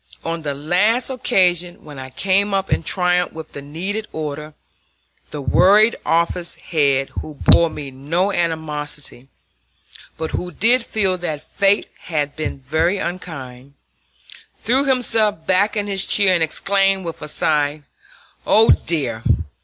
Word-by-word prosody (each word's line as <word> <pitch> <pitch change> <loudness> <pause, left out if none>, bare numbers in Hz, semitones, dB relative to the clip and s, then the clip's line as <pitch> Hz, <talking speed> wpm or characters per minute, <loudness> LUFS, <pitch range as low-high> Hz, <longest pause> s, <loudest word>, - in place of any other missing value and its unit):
On 165 0 -3
the 145 -2 -3
last 205 - +1
occasion, 180 -9 +1
when 145 -3 -10
I 130 0 -8
came 195 +6 +1
up 195 0 -2
in - - 0
triumph 180 +2 +1
with 160 -1 -9
the 140 - -8
needed 190 +9 -4
order, 150 0 -6 0.7
the 145 -2 -6
worried 205 - +5
office 170 +1 0
head, 140 -4 0
who 155 - -9
bore 170 +3 +5
me 145 -3 -7
no 165 +9 -1
animosity, 150 -6 -4 0.9
but 160 0 -4
who 180 - -3
did 240 +5 +3
feel 195 -5 0
that 155 -4 -4
fate 200 +1 +2 0.2
had 150 -3 -2
been 155 -3 -4
very 160 +8 0
unkind, 140 -8 -7 0.8
threw 260 +6 +1
himself 225 -9 +1
back 200 +4 +2
in 205 - 0
his 195 -1 +2
chair 200 -3 +4
and 175 - +1
exclaimed 195 +3 +1
with 165 -1 -6
a 150 - -6
sigh: 150 -1 0 0.6
"Oh, 225 +1 +5
dear! 130 -9 0
170 Hz, 140 wpm, -20 LUFS, 150-195 Hz, 0.9 s, worried